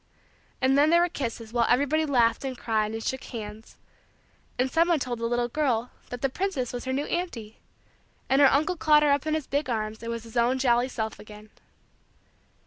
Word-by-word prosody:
And 265 +1 +3
then 290 +2 +5
there 340 +1 +5
were 350 - +2
kisses 230 -6 -5
while 235 -1 +2
everybody 285 +5 +2
laughed 235 -4 +2
and 260 -2 -4
cried 215 -2 -1
and 225 - -5
shook 265 0 -3
hands; 220 -2 -8 0.8
and 255 +1 0
some 335 +1 +3
one 340 -2 +3
told 250 -4 -4
the 230 - -1
little 240 0 0
girl 245 -3 -1 0.2
that 245 +1 -7
the - - +4
princess 270 -5 -3
was 245 - -5
her 260 - -2
new 280 +3 -1
auntie; 250 -12 -4 0.7
and 270 +2 +3
her 275 - +7
uncle 310 +6 +1
caught 300 -2 +4
her 295 - +4
up 285 +2 +1
in 310 - +1
his 310 -3 -3
big 285 0 -2
arms 215 -2 -3
and 230 0 -4
was 230 -1 -5
his 230 +1 -13
own 240 +2 +3
jolly 245 -1 +2
self 220 -4 -4
again. 210 0 -13
255 Hz, 210 wpm, -26 LUFS, 230-290 Hz, 0.8 s, her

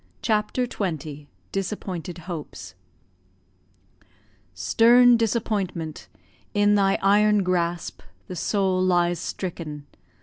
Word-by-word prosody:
CHAPTER 215 +3 0
XX 155 - -5 0.2
DISAPPOINTED 185 -3 -4
HOPES 145 - -7 1.8
Stern 240 - +5
Disappointment, 205 -8 -2 0.5
in 205 0 +4
thy 195 -1 +3
iron 205 +1 +4
grasp 175 -1 -2 0.2
The 180 - -7
soul 190 +1 0
lies 175 -1 +2
stricken. 155 -6 -6
185 Hz, 80 wpm, -24 LUFS, 170-210 Hz, 1.8 s, Stern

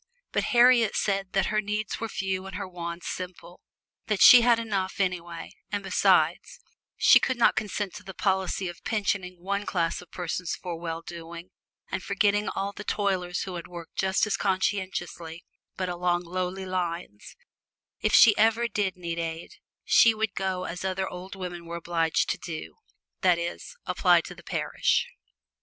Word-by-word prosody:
But - - 0
Harriet 240 -3 +5
said 195 -2 -1
that 195 - +2
her 215 - +2
needs 210 0 -3
were 225 - -3
few 190 -1 -3
and 195 - -8
her - - -4
wants 170 -1 -6
simple; 180 -1 -7 0.5
that 210 -3 0
she 245 - +10
had 235 0 +5
enough 200 -5 -2
anyway, 175 -3 -2 0.2
and 205 -1 -2
besides, 195 - +2 0.4
she - - +7
could 260 - -1
not 235 - +4
consent 205 -2 -2
to - - -12
the 190 - -9
policy 190 -1 0
of 175 -1 -9
pensioning 200 -4 -1
one 200 +2 -1
class 170 -3 0
of 180 - -16
persons 180 0 -3
for 175 -2 -6
well 165 0 -5
doing 170 +1 -9 0.4
and - - -2
forgetting 205 +1 +1
all 195 +1 -3
the 205 - -8
toilers 185 -4 -1
who 190 - -6
have 170 -1 -6
worked 170 -2 -10
just 190 +2 +2
as 210 - -1
conscientiously, 185 -3 -2 0.3
but 185 - -1
along 175 0 0
lowly 185 +2 -3
lines; 175 - -4 0.6
if - - +1
she 215 -3 +8
ever 225 +2 +3
did 200 -4 -1
need 170 -1 -4
aid, 165 0 -4 0.3
she 230 -1 +6
would 215 -2 -1
do 190 -1 -2
as 180 +2 -5
other 190 0 -1
old 185 +2 -8
women 175 -2 -6
were 170 - -5
obliged 165 -1 0
to - - -4
do, 160 - -7 0.4
that 180 -2 +4
is, 170 - -5
apply - - +4
to - - -9
the - - -14
parish. - - 0
185 Hz, 170 wpm, -27 LUFS, 175-200 Hz, 0.6 s, she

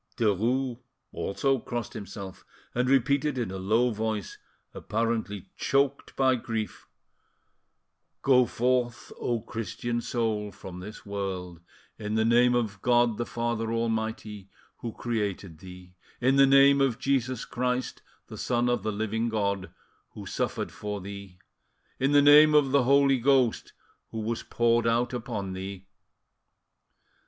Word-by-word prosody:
Derues 120 +4 +1 0.3
also 135 +6 0
crossed 120 -1 -5
himself, 100 -1 -8 0.3
and 125 +1 0
repeated 135 +2 +2
in 115 -6 -2
a 95 - -5
low 115 +6 +2
voice, 110 -3 -3 0.3
apparently 110 -3 -2
choked 140 0 0
by 130 -1 +3
grief 115 -5 -4 1.4
"Go 125 -2 +5
forth, 120 -1 -1
O 120 -2 -1
Christian 120 +2 -4
soul, 110 -4 -2
from 90 -2 -10
this 105 +4 -10
world, 95 -4 -5 0.4
in 105 0 -3
the 110 0 +2
name 120 +1 +4
of 105 -5 -2
God 120 -2 +3
the 120 - -2
Father 115 -1 -2
Almighty, 110 -3 -3 0.3
who 115 - -5
created 100 -8 -3
thee; 90 0 -12 0.3
in 130 +2 +3
the 135 0 +6
name 140 +1 +6
of 130 -4 +2
Jesus 130 -2 -1
Christ, 125 +1 -2 0.2
the - - -10
Son 120 0 +1
of 120 -3 +1
the 110 +2 -2
living 110 +2 -1
God, 100 -3 -1 0.4
who - - -9
suffered - - -3
for 105 -1 -5
thee; 100 -1 -9 0.6
in 135 +2 +2
the 145 0 +6
name 150 +1 +8
of 145 -3 +4
the 140 -3 +3
Holy 140 0 +4
Ghost, 130 -2 +2 0.4
who 110 - -5
was 115 +2 -2
poured 120 0 +1
out 120 +2 +1
upon 110 -6 -4
thee." 95 0 -7
115 Hz, 135 wpm, -27 LUFS, 105-125 Hz, 1.4 s, name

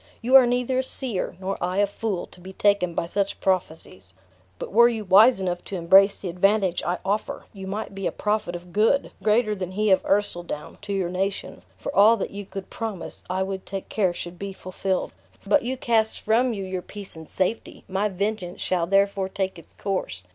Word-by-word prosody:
You 245 +3 -2
are 265 -2 +9
neither 250 +1 +1
a - - +1
seer, 245 -8 0
nor 190 +1 -3
I 180 +1 -1
a 205 - +4
fool, 200 -2 -3
to 180 - -17
be 190 +2 -10
taken 200 -4 +2
by - - 0
such 200 +3 -2
prophecies. 160 - -2 0.4
But - - -6
were 235 +2 +7
you 220 -3 -4
wise 210 +5 +6
enough 175 -2 -2
to 200 - -5
embrace 190 +3 +5
the 195 - -4
advantage 190 +1 +2
I 175 +1 -1
offer, 205 +2 -2
you 190 -2 -8
might 205 +1 -4
be 195 -1 -3
a - - -1
prophet 210 -4 -1
of 175 0 -10
good, 225 +7 +2
greater 215 +1 +2
than 185 -2 -5
he 210 +1 +1
of 190 - +5
Ercildown, 175 -6 -2
to 205 0 -6
your 185 -3 -1
nation; 190 - -3 0.2
for - - -6
all 215 +4 +7
that 195 - -4
you 200 -1 -7
could 195 0 -8
promise, 220 -6 -6
I 185 +1 0
would 190 0 -4
take 195 0 -6
care 195 -4 +1
should 175 0 -7
be 200 -1 -5
fulfilled. 185 0 -3 0.3
But 295 - +4
you 260 +1 -3
cast 225 -3 +1
from 240 +4 +2
you 200 -4 -4
your 185 -1 -4
peace 200 0 -9
and 160 -1 -11
safety; 200 +5 -2
my 195 +2 0
vengeance 195 -1 -3
shall 175 -2 0
therefore 195 0 +2
take 190 -2 -3
its - - -17
course. 185 - -3
195 Hz, 205 wpm, -24 LUFS, 185-210 Hz, 0.4 s, are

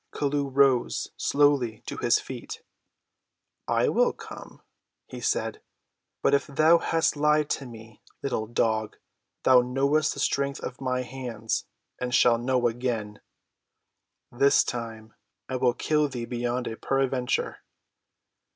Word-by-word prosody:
Chelluh 145 -1 -1
rose 135 -2 +2
slowly 140 -6 +2
to - - -6
his - - +3
feet. - - -8 1.0
"I - - +2
will - - +2
come," - - -11 0.4
he - - -9
said; - - -1 0.6
"but - - +3
if 140 - +2
thou 155 +4 +4
hast 165 -1 +1
lied 150 0 +2
to 135 - -2
me, 110 -2 -13 0.2
little 110 -5 -2
dog, 110 -2 0 0.5
thou 130 -1 +6
knowest 140 +5 +1
the - - -7
strength 140 0 0
of 125 - -7
my 125 -1 -1
hands, 120 -3 -4 0.3
and 125 0 -1
shalt 120 -1 +4
know 125 0 +2
again. 115 -3 -3 1.1
This 140 +3 +4
time 115 -2 -6 0.3
I 130 - -2
will 125 -1 +2
kill 150 -1 +1
thee 120 -3 -5
beyond 120 +1 -2
a 110 - -5
peradventure." 135 -2 -1
125 Hz, 130 wpm, -26 LUFS, 120-140 Hz, 1.1 s, thou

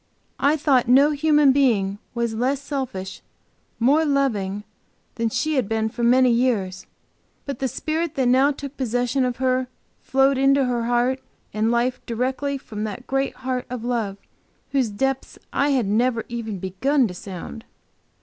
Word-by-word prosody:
I 290 +3 +3
thought 270 -5 +2
no 275 +5 +6
human 295 -1 +4
being 215 -8 +2 0.2
was 235 -1 -1
less 255 +5 0
selfish, 260 -10 -5 0.6
more 280 +7 +4
loving 220 -9 0 0.5
than 230 -1 -1
she 310 +6 -1
had 250 -6 0
been 220 0 0
for 240 - -7
many 250 +1 +5
years, 220 -7 0 0.6
but 280 -3 -5
the 265 - 0
spirit 315 +5 -2
that 265 - +1
now 260 +3 +4
took 280 0 -7
possession 245 +1 0
of 250 -1 -2
her 255 0 +1 0.3
flowed 270 0 +2
into 275 0 +4
her 240 -2 -1
heart 245 +2 +1 0.3
and 215 +2 +1
life 240 +2 0
directly 260 +4 -1
from 215 -5 -7
that 215 +4 -6
great 270 0 -1
Heart 255 -1 -2
of 250 -2 -5
love, 225 -5 -1 0.5
whose 265 -5 +1
depth 270 +6 -2 0.2
I 280 +1 +2
had 260 -5 +2
never 230 +3 +1
even 225 -4 -4
begun 235 +9 +1
to 180 - -7
sound. 190 +4 -8
250 Hz, 160 wpm, -23 LUFS, 225-275 Hz, 0.6 s, no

